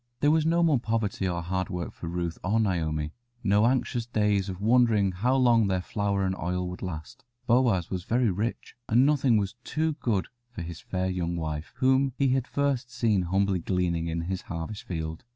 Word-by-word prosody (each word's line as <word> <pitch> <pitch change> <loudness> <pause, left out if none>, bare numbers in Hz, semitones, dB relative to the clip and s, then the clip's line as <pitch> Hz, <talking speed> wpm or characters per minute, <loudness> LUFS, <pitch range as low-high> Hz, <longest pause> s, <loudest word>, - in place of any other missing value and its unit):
There 145 - +4
was 160 0 +3
no 170 +1 +3
more 155 -6 +4
poverty 110 -5 -1
or 85 -1 -2
hard 95 +1 -2
work 90 -1 -3
now - - -14
for 85 - -8
Ruth 85 -1 -3
or 105 +5 +1
Naomi, 80 -7 -1 0.3
no 105 +2 +4
anxious 120 -2 0
days 105 -4 +1
of 95 -1 -6
wondering 110 -3 +3
how 120 +9 +1
long 120 -5 +4
their 95 -1 +1
flour 100 -1 -1
and 95 0 0
oil 90 +1 -2
would 90 - -8
last. 80 -3 -7 0.2
Boaz 120 -8 +2
was 90 -2 -3
very 120 -2 +2
rich, 110 +7 -3
and 120 +4 +5
nothing 135 -5 +3
was 100 0 -1
too 160 +1 0
good 105 -6 0 0.2
for 115 -8 -7
his 85 -1 -7
fair 95 0 -2
young 90 -2 -2
wife, 80 -2 -4
whom 130 0 +2
he 140 -1 +2
had 130 -1 +1
first 140 -3 0
seen 110 -6 +1
humbly 95 0 +2
gleaning 85 -1 -1
in 85 0 -2
his 95 +2 -3
harvest 85 +5 -6
field. 80 -2 -4
100 Hz, 200 wpm, -27 LUFS, 90-120 Hz, 0.3 s, and